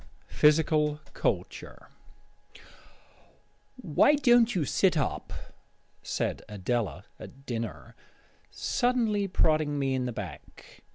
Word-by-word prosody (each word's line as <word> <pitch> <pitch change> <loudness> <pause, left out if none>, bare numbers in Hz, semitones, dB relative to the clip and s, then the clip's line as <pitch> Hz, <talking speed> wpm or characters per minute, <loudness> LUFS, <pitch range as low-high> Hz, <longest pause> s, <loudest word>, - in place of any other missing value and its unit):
PHYSICAL 150 0 +3
CULTURE - - -3 1.9
"Why 255 - +3
don't 240 -4 +4
you 165 -5 0
sit 180 +3 +2
up?" 145 - -2 0.7
said - - -3
Adela 105 -1 -3
at 135 0 -12
dinner, 115 -3 -6 0.5
suddenly 225 -5 0
prodding 155 -5 +1
me 135 -1 0
in 130 -1 -1
the 125 - -2
back. 105 -6 -10
150 Hz, 95 wpm, -28 LUFS, 125-205 Hz, 1.9 s, don't